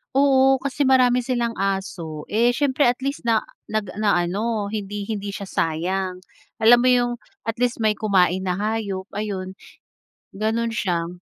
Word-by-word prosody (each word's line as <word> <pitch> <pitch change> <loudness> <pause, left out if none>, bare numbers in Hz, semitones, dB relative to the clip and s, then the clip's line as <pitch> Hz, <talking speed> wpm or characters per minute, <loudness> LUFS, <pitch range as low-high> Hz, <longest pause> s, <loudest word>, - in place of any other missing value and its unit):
Oo, 270 -1 +4
kasi 275 +1 -1
marami 250 -2 +4
silang 240 -2 -1
aso, 190 -6 -3
eh, 235 +3 +3
syempre 280 +2 +1
at 245 0 +2
least 275 0 -3
na 230 -2 +3 0.3
nag 210 -4 -2
na 205 -4 +2
ano 205 +4 -1
hindi 205 -1 -5
hindi 205 -2 -4
siya 200 -1 -6
nasayang. 180 +3 -1 0.4
Alam 240 +2 +7
mo - - +3
'yong, 245 -1 +2 0.3
at 225 - -1
least 245 -1 0
may 215 -1 +2
kumain 190 -3 +2
na 185 +1 -2
hayop 205 -3 -2
ayun, 190 -3 -4 0.8
ganun 220 +3 0
siya. 175 -6 -1
215 Hz, 155 wpm, -22 LUFS, 190-240 Hz, 0.8 s, Alam